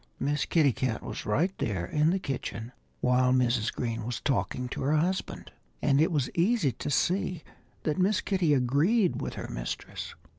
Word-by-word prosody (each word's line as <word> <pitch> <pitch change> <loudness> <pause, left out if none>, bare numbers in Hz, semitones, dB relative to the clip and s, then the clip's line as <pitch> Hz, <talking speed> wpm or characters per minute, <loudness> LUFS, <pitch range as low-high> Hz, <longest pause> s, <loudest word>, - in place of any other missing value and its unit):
Miss 145 +2 0
Kitty 150 -6 +3
Cat 125 -2 -2
was 105 - -6
right 165 - +1
there 95 -5 -1
in 150 - +2
the 185 - +2
kitchen 125 - -4 0.3
while 125 0 +3
Mrs. 125 -3 +2
Green 115 -2 -3
was 120 +2 -3
talking 125 -1 -1
to - - -5
her 145 +3 +2
husband. 180 +5 -2 0.3
And 140 0 +3
it 160 - +3
was 145 -6 0
easy 180 - +2
to 120 - -5
see 180 +3 0 0.4
that 155 +3 -1
Miss 195 +2 +3
Kitty 180 -7 +2
agreed 155 - +2
with - - -4
her - - -5
mistress. - - -5
140 Hz, 175 wpm, -28 LUFS, 125-170 Hz, 0.4 s, Kitty